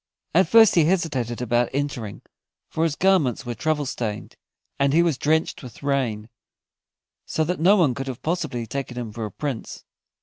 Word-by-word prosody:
At 185 Hz, +4 st, +4 dB
first 225 Hz, -2 st, +7 dB
he 165 Hz, -3 st, +4 dB
hesitated 135 Hz, -10 st, -1 dB
about 120 Hz, 0 st, +1 dB
entering, 125 Hz, -8 st, -3 dB, 0.5 s
for 160 Hz, -, 0 dB
his 155 Hz, -3 st, -1 dB
garments 170 Hz, -10 st, +2 dB
were 120 Hz, -, -3 dB
travel 150 Hz, +4 st, -1 dB
stained, 115 Hz, -6 st, -4 dB, 0.4 s
and 140 Hz, 0 st, +2 dB
he 170 Hz, +2 st, +5 dB
was 170 Hz, -4 st, +1 dB
drenched 155 Hz, +5 st, 0 dB
with 125 Hz, -1 st, -12 dB
rain, 125 Hz, -7 st, -1 dB, 1.0 s
so 160 Hz, -, 0 dB
that 175 Hz, +3 st, -2 dB
no 185 Hz, +6 st, +5 dB
one 165 Hz, -10 st, +3 dB
could 135 Hz, +3 st, -5 dB
have 130 Hz, -3 st, -6 dB
possibly 155 Hz, -8 st, -2 dB
taken 130 Hz, 0 st, -5 dB
him 120 Hz, -3 st, -4 dB
for 115 Hz, 0 st, -4 dB
a 105 Hz, -, -6 dB
Prince. 135 Hz, +1 st, -5 dB
140 Hz, 175 wpm, -23 LUFS, 120-160 Hz, 1.0 s, first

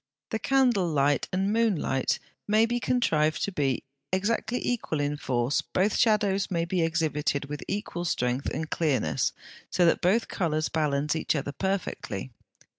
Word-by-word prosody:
The 220 Hz, -, -1 dB
candle 245 Hz, -7 st, +3 dB
light 145 Hz, -2 st, +2 dB
and 195 Hz, +3 st, 0 dB
moon 225 Hz, -3 st, +3 dB
light 135 Hz, -3 st, 0 dB, 0.3 s
may 215 Hz, +2 st, +4 dB
be 240 Hz, +1 st, -1 dB
contrived 155 Hz, -12 st, +1 dB
to 200 Hz, -, -1 dB
be 140 Hz, -7 st, 0 dB, 0.3 s
exactly 220 Hz, +5 st, 0 dB
equal 225 Hz, -10 st, -1 dB
in 145 Hz, 0 st, 0 dB
force; 125 Hz, -1 st, 0 dB
both 195 Hz, +3 st, 0 dB
shadows 205 Hz, -3 st, +2 dB
may 170 Hz, -2 st, 0 dB
be 175 Hz, +1 st, 0 dB
exhibited 155 Hz, -3 st, 0 dB
with 145 Hz, 0 st, -6 dB
equal 195 Hz, -4 st, -3 dB
strength 125 Hz, -4 st, 0 dB
and 160 Hz, -, -3 dB
clearness, 135 Hz, -, 0 dB, 0.4 s
so 180 Hz, -, +3 dB
that 165 Hz, -, +3 dB
both 205 Hz, +6 st, +2 dB
colours 155 Hz, -3 st, -1 dB
balance 150 Hz, -1 st, 0 dB
each 160 Hz, -, 0 dB
other 145 Hz, -1 st, -2 dB
perfectly. 180 Hz, -, -3 dB
165 Hz, 155 wpm, -27 LUFS, 145-205 Hz, 0.4 s, may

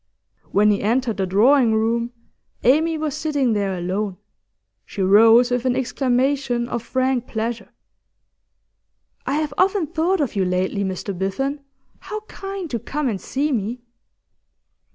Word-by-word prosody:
When 210 Hz, +1 st, +4 dB
he 200 Hz, -, 0 dB
entered 230 Hz, +1 st, 0 dB
the 190 Hz, -1 st, -1 dB
drawing 230 Hz, +4 st, +4 dB
room 230 Hz, +2 st, 0 dB, 0.5 s
Amy 315 Hz, +6 st, +3 dB
was 310 Hz, -2 st, -2 dB
sitting 285 Hz, -6 st, 0 dB
there 200 Hz, -3 st, -1 dB
alone; 185 Hz, +2 st, -3 dB, 0.7 s
she 195 Hz, -, -4 dB
rose 225 Hz, +5 st, +6 dB
with 245 Hz, -1 st, 0 dB
an 250 Hz, -1 st, +2 dB
exclamation 255 Hz, -1 st, 0 dB
of 240 Hz, -1 st, -3 dB
frank 255 Hz, +1 st, -1 dB
pleasure. 225 Hz, +1 st, -4 dB, 1.6 s
'I 275 Hz, -, 0 dB
have 300 Hz, -1 st, -1 dB
often 380 Hz, -1 st, +3 dB
thought 340 Hz, +4 st, 0 dB
of 280 Hz, -6 st, -1 dB
you 195 Hz, -, +1 dB
lately, 185 Hz, +2 st, -1 dB
Mr 190 Hz, +1 st, -4 dB
Biffen. 230 Hz, +11 st, -2 dB, 0.4 s
How 430 Hz, 0 st, -6 dB
kind 390 Hz, -3 st, -7 dB
to 235 Hz, -, -1 dB
come 295 Hz, +5 st, -3 dB
and 200 Hz, -4 st, -4 dB
see 290 Hz, +3 st, -1 dB
me! 235 Hz, 0 st, -2 dB
240 Hz, 140 wpm, -21 LUFS, 210-285 Hz, 1.6 s, rose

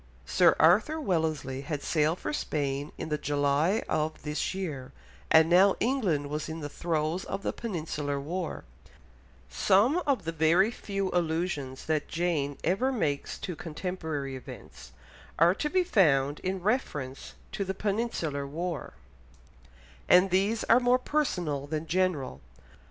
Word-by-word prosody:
Sir -, -, +4 dB
Arthur 210 Hz, -, +4 dB
Wellesley 160 Hz, -, -1 dB
had 145 Hz, 0 st, -4 dB
sailed 155 Hz, +1 st, +1 dB
for -, -, -4 dB
Spain 145 Hz, -, -2 dB
in 160 Hz, -, -5 dB
the 150 Hz, -1 st, -1 dB
July 145 Hz, +7 st, +1 dB
of 155 Hz, +1 st, -2 dB
this 150 Hz, +4 st, -2 dB
year, 150 Hz, -9 st, -5 dB, 0.4 s
and 160 Hz, 0 st, +6 dB
now 185 Hz, +3 st, +5 dB
England 190 Hz, -, 0 dB
was 150 Hz, +1 st, -3 dB
in 160 Hz, +1 st, -5 dB
the 145 Hz, -2 st, -5 dB
throes 165 Hz, +2 st, -1 dB
of 200 Hz, -, -5 dB
the -, -, -1 dB
Peninsular 155 Hz, -9 st, -3 dB
War; 175 Hz, +6 st, -4 dB, 0.8 s
some 215 Hz, -, +3 dB
of 265 Hz, -9 st, +1 dB
the 165 Hz, -, -2 dB
very 165 Hz, +6 st, +3 dB
few 195 Hz, -4 st, -3 dB
allusions 160 Hz, -6 st, -2 dB
that 155 Hz, -2 st, 0 dB
Jane 160 Hz, -5 st, -1 dB
ever 220 Hz, +10 st, +1 dB
makes 145 Hz, -, -2 dB
to 180 Hz, -, -4 dB
contemporary 160 Hz, -4 st, -4 dB
events 60 Hz, -, -11 dB, 0.5 s
are 170 Hz, +2 st, +5 dB
to 300 Hz, +9 st, -2 dB
be 370 Hz, +3 st, +2 dB
found 145 Hz, -, +3 dB
in 185 Hz, -1 st, -3 dB
reference 150 Hz, -, -2 dB, 0.2 s
to 200 Hz, -, -2 dB
the 190 Hz, 0 st, -4 dB
Peninsular 195 Hz, -9 st, -2 dB
War, 165 Hz, 0 st, -4 dB, 1.2 s
and 180 Hz, +1 st, +6 dB
these 200 Hz, +5 st, +1 dB
are 240 Hz, -, +5 dB
more 250 Hz, 0 st, +4 dB
personal 180 Hz, -, -1 dB
than 155 Hz, +1 st, -3 dB
general. 160 Hz, -, -1 dB
165 Hz, 140 wpm, -28 LUFS, 145-195 Hz, 1.2 s, and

